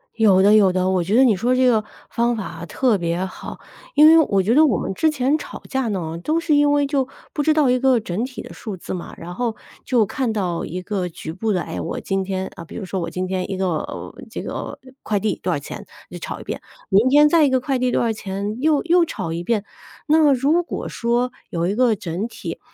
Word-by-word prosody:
有 200 -4 +5
的 205 +2 +6
有 195 -4 +5
的， 185 0 +1
我 185 -1 +2
觉 195 +6 0
得 260 - +6
你 225 -6 +4
说 245 +6 +1
这 255 0 +3
个 225 -4 +3 0.3
方 235 0 +1
法 215 - -4
啊， 170 -2 -7
特 235 +3 +1
别 170 +1 -1
好。 190 - -8 0.4
因 300 - +7
为 325 +1 +8
我 195 -2 +2
觉 215 +5 +2
得 310 +4 +6
我 235 - +2
们 - - -3
之 315 +11 +2
前 285 +1 +1
吵 - - -9
架 265 -3 -1
呢， 170 -5 -3
都 310 - 0
是 335 -2 0
因 290 0 +4
为 290 -1 +3
就 275 -2 0 0.3
不 295 - -1
知 310 +2 +3
道 300 -4 +3
一 250 0 +3
个 260 -1 +4
整 210 +3 -2
体 255 -1 -8
的 - - -10
数 210 -4 -6
字 175 - -7
嘛。 180 - -6
然 175 +1 -8
后 235 +2 -2 0.3
就 240 -4 +3
看 250 +3 -2
到 180 -5 -2
一 180 +3 -5
个 185 -1 -2
局 160 -2 -7
部 210 +5 -1
的， 180 - 0
哎， - - -5
我 - - -4
今 195 -1 -1
天， 190 0 -3
啊 170 - -9
比 - - -12
如 220 - -5
说 190 0 -3
我 165 -1 -3
今 185 +2 -3
天 185 0 -3
一 195 - -2
个 180 -5 -3 0.2
这 - - -5
个 - - -5 0.2
快 210 - -1
递 215 +2 -1
多 - - -1
少 - - +1
钱， - - -8 0.2
就 - - -8
吵 - - -6
一 - - -9
遍， - - -5 0.3
明 205 +5 +4
天 295 +3 +6
再 320 -1 +5
一 280 - +3
个 260 -1 +1
快 270 -1 -1
递 255 0 +1
多 - - +1
少 230 - +1
钱， 205 0 -4
又 305 -2 +2
又 345 0 +4
吵 165 - -5
一 170 +1 -3
遍。 215 -1 0 0.4
那 315 +1 +5
么 295 -2 +5
如 285 +7 +2
果 - - -5
说 240 +1 0 0.2
有 170 0 -1
一 195 - 0
个 240 -1 +3
整 185 +2 -4
体， - - -7
220 Hz, 275 characters per minute, -21 LUFS, 185-265 Hz, 0.4 s, 为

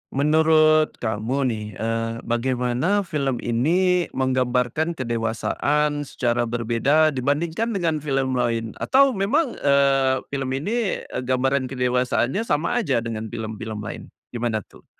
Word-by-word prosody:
menurut 155 +1 +4
kamu 110 +4 -2 0.2
nih, 105 -1 -4
eee, 115 +1 -2
bagaimana 125 - 0
film 140 -7 -2
ini 175 +9 +2
menggambarkan 130 +4 0
kedewasaan 130 +5 -1
secara 120 -1 0
berbeda 120 +7 +2
dibandingkan 160 - -1
dengan 165 -5 0
film 135 -3 -1
lain, 115 -2 -1
atau 275 +1 +4
memang, 240 +7 +1
eee, 135 -2 +3
film 135 -2 -2
ini, 210 - -1
e - - -7
gambaran 130 +1 0
kedewasaannya 125 - 0
sama 205 +11 +1
aja 130 - 0
dengan 110 -1 -4
film-film 110 -1 -6
lain. - - -7 0.2
Gimana 115 -4 -2
tuh? - - -20
130 Hz, 120 wpm, -23 LUFS, 120-155 Hz, 0.2 s, menurut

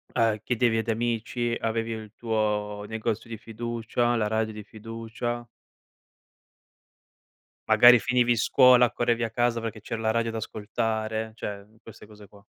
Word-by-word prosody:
uhm, 110 -2 +2
chiedevi 120 -2 +1
ad 110 - -4
amici? 115 +1 -1
Avevi 115 0 -2
il 110 -1 -7
tuo 105 -2 -2
negozio 110 +1 -3
di 115 - -6
fiducia? 120 +1 -2
La 110 -2 0
radio 110 0 -1
di 105 0 -8
fiducia? 115 +2 -6 2.2
Magari 120 0 +8
finivi 120 0 +2
scuola, 125 +1 +5
correvi 120 -1 0
a 115 - -1
casa 120 0 0
perché 110 -1 -5
c'era 110 +2 -5
la 110 0 +1
radio 115 0 0
da 115 - -5
ascoltare, 110 0 -3
cioè, 100 -3 -6
mhmm, 110 +2 -25
queste 110 -1 -13
cose 105 -1 -15
qua. 100 +1 -19
115 Hz, 150 wpm, -26 LUFS, 110-120 Hz, 2.2 s, Magari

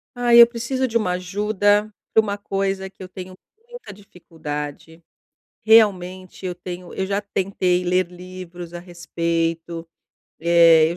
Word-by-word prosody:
Ai, 240 -1 +6
eu 235 - +10
preciso 250 +3 -2
de 230 -1 +1
uma 200 -5 -1
ajuda 205 +3 +1 0.2
pra 220 - +6
uma 205 -1 -3
coisa 195 -1 -2
que 190 - -20
eu - - -8
tenho 185 0 -9 0.3
muita 485 - -10
dificuldade, 160 -4 -8 0.6
realmente 185 -4 +2
eu 180 - -3
tenho 175 0 -8
eu 190 - -2
já 200 +1 -1
tentei 185 -3 -1
ler 180 0 +1
livros 180 -1 -10
a 175 - -6
respeito, 170 -1 -3 0.5
eh, 165 -1 +6
eu - - -7
185 Hz, 140 wpm, -22 LUFS, 175-205 Hz, 0.6 s, eu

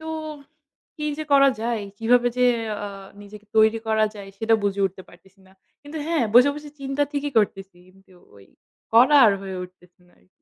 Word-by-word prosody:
তো, 315 - -10 0.9
কি 300 - -5
যে 310 - -4
করা 275 0 +6
যায়, 230 -2 -2 0.2
কিভাবে 245 +2 +3
যে 250 - +4 0.4
আ - - -4 0.4
নিজেকে 210 +1 -14
তৈরি 220 +1 +4
করা 220 0 +2
যায়, 200 -2 -10
সেটা 225 +1 +2
বুঝে 200 0 -1
উঠতে 190 0 -10
পারতেছি 190 +2 -21
না। 190 - -22 0.3
কিন্তু 290 +2 -10
হ্যাঁ, 325 -7 +1
বসে, 250 +4 +7
বসে 295 0 -10
চিন্তা 275 +1 -2
ঠিকই 285 0 -3
করতেছি, 195 -3 -2 0.2
কিন্তু 190 -1 -24 0.2
ওই, 100 - -18 0.5
করা 260 +6 +6
আর 210 - +4
হয়ে 190 -1 -6
উঠতেছে 180 0 -20
না - - -27
আরকি। - - -31
220 Hz, 185 wpm, -23 LUFS, 195-275 Hz, 0.9 s, বসে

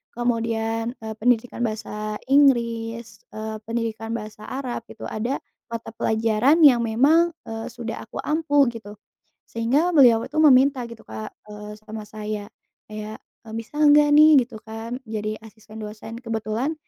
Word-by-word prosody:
kemudian, 230 0 -1
eee, 220 - -5
pendidikan 245 +1 +1
Bahasa 215 -2 -3
Inggris, 235 -5 +2 0.2
eee, 220 0 -5
pendidikan 225 -1 -3
Bahasa 215 -1 -8
Arab 260 -2 -4
gitu, - - -12
ada 235 +5 -3 0.2
mata 230 -2 -6
pelajaran 225 +8 +2
yang 265 -5 +8
memang, 290 +10 +3
eee, 225 +1 -6
sudah 235 -1 -6
aku - - -16
ampu, 300 -2 +2
gitu. 215 -3 -10 0.5
Sehingga 270 +10 +1
beliau 240 -7 +6
itu - - -12
meminta 270 -2 +5
gitu, 230 -1 -12
Kak, 110 0 -7 0.2
eee, 210 0 -8
sama 215 0 -8
saya, 210 -1 -6 0.4
kayak, 215 0 -7 0.3
e - - -16
"Bisa 230 +6 -6
enggak 295 0 +6
nih," 300 -1 +7
gitu 235 -2 -7
kan, 225 +2 -6
"jadi 215 -1 -4
asisten 220 0 -14
dosen?" 215 +1 -8
Kebetulan, 230 +4 -2
230 Hz, 140 wpm, -23 LUFS, 220-255 Hz, 0.5 s, yang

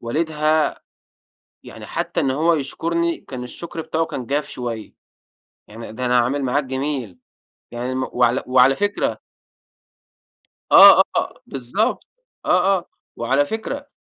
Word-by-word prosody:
والدها 155 +4 0 0.8
يعني - - -11
حتّى - - -3
إن 135 - +1
هو 160 +5 +2
يشكرني 170 +3 -1
كان 125 -2 -8
الشكر 165 +6 -8
بتاعه 160 0 -1
كان 125 - -6
جاف 145 +3 -1
شويّة، 115 -3 -6 0.7
يعني 110 +1 -9
ده 125 +3 -4
أنا 125 0 +3
أعمل 130 +4 0
معاك 135 +3 0
جميل، 130 - -4 0.5
يعني 120 +2 -4
المف 130 0 -2
وعلى 120 +1 +2
وعلى 130 +1 +4
فكرة 205 +1 -1 1.5
آه، - - +10
آه، - - -2
بالضبط. 205 - -2 0.4
آه، 195 0 +3
آه. 175 - -12 0.3
وعلى 135 +5 +1
فكرة 255 - -5
135 Hz, 130 wpm, -21 LUFS, 125-160 Hz, 1.5 s, آه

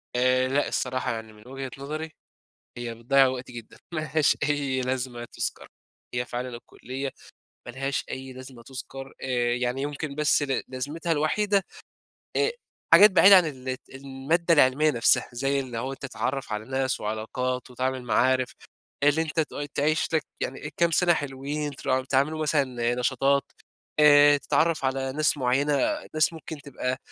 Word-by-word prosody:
آآ 130 +1 +3
لأ 140 +2 +1
الصراحة. 130 0 -1
يعني 110 -1 -7
من 105 +2 -17
وجهة 135 0 -6
نظري، 155 +3 -5 0.7
هي 120 -1 -5
بتضيّع 135 +4 +4
وقت 130 -1 -4
جدًا. 120 -2 -10 0.2
ما 155 - 0
لهاش 155 -1 +2
أي 140 -3 0
لازمة 125 -2 -3
تُذكَر. - - -3 0.5
هي 125 0 0
فعلًا 125 +1 -4
الكُلّية 130 +3 -6 0.6
ما 120 - -7
لهاش 135 0 -2
أي 130 0 -6
لازمة 130 -2 -11
تُذكَر، 135 +1 -8
آآ 120 -2 0
يعني 125 +2 -1
يمكن 145 0 -4
بس 150 0 +2
ل 135 -3 -1
لازمتها 145 +6 -4
الوحيدة 195 +6 +1 0.7
أ 435 - +3 0.4
حاجات 200 +4 +9
بعيدة 195 +1 +8
عن 180 - +4
الت 130 -3 -6
المادة 140 +6 0
العلمية 145 +1 +4
نفسها. 115 -4 +3
زي 135 +3 0
اللي 130 -3 -5
هو 130 +4 -3
أنت - - -13
تتعرّف 135 -2 -3
على 105 +1 -4
ناس 130 +1 -1
وعلاقات، 125 +4 -3
وتعمل 130 +1 -2
معارف 130 +1 +2 0.5
آآ - - +5
اللي 155 +2 +1
أنت 160 0 -2
تؤي 145 -2 -2
تعيش 150 +3 0
لك. 160 - +2 0.2
يعني 130 - -3
إيه 145 - -6
كام 170 0 +3
سَنة 175 +1 +4
حلوين 145 0 -4
ترا 130 0 0
تعملوا 145 +4 +1
مثلًا 130 -6 0
نشاطات، 135 +2 +2 0.6
آآ 145 -1 +7
تتعرّف 160 0 +1
على 135 0 -1
ناس 150 +1 +1
معيّنة، 135 +3 +1 0.4
ناس 155 +1 +3
ممكن 160 -2 -8
تبقى 130 -2 -3
135 Hz, 160 wpm, -26 LUFS, 125-150 Hz, 0.7 s, حاجات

